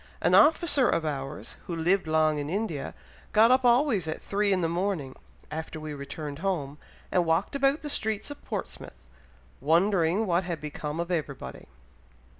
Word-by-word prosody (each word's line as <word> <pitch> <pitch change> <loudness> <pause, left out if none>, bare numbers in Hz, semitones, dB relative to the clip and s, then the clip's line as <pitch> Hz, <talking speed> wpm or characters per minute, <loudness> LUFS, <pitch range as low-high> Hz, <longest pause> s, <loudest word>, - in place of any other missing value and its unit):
An - - +2
officer 300 -4 +5
of 160 - 0
ours, 140 -1 -5
who 175 - -3
lived 175 +2 +1
long 155 -1 +2
in 145 0 -4
India, 185 -6 -3 0.4
got 225 +3 +6
up 260 +1 +4
always 240 - +3
at 160 - -3
three 205 0 0
in 185 -1 +2
the 165 - +1
morning, 170 -5 -2 0.4
after 160 +1 -5
we 155 -1 -6
returned 145 +1 -6
home, 155 -6 -2 0.3
and 180 - +3
walked 165 +9 0
about 275 +2 +2
the 300 - -6
streets 220 +2 -2
of 290 - -10
Portsmouth, 65 - -7 0.5
wondering 175 - +2
what 175 -1 +1
had 175 -3 -4
become 150 +1 -5
of 170 +1 -3
everybody." 150 -5 -4
170 Hz, 165 wpm, -27 LUFS, 155-210 Hz, 0.5 s, got